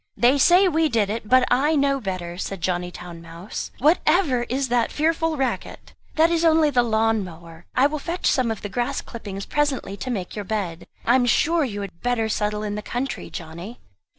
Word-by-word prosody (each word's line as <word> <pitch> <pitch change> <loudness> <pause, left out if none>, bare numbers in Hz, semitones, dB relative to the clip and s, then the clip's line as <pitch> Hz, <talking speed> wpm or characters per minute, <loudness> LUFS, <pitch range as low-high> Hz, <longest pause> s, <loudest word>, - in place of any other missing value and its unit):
"They 255 +4 +4
say 360 +6 +6
we 320 -2 +2
did 215 -5 +1
it; 215 -1 -5
but 255 0 +6
I 285 +6 +3
know 275 -1 +2
better," 185 -4 -4
said 195 -1 -4
Johnny 175 +1 -1
Town 175 -1 -10
mouse. 170 +4 -7
"Whatever 305 -3 +2
is 265 +1 -1
that 240 -2 +1
fearful 325 +1 0
racket?" 270 -1 -3 0.2
"That 325 +2 +4
is 335 -1 +1
only 320 -2 +4
the 250 -3 +4
lawn 225 -2 +1
mower; 170 -1 -12
I 260 - +5
will 300 +1 0
fetch 340 +5 -4
some 255 -3 +2
of 225 - -4
the - - -2
grass 240 +5 -2
clippings 200 -4 -7
presently 285 -9 -1
to 255 - -5
make 195 -7 -4
your 210 - -4
bed. 185 -5 -4 0.2
I 240 - +4
am 250 -1 +3
sure 325 +7 +3
you 205 -6 -3
had 180 -4 -8
better 240 -3 0
settle 210 0 -1
in 210 -1 -3
the 210 - -4
country, 250 +5 -4
Johnny." 170 +7 -8
235 Hz, 205 wpm, -23 LUFS, 195-285 Hz, 0.2 s, say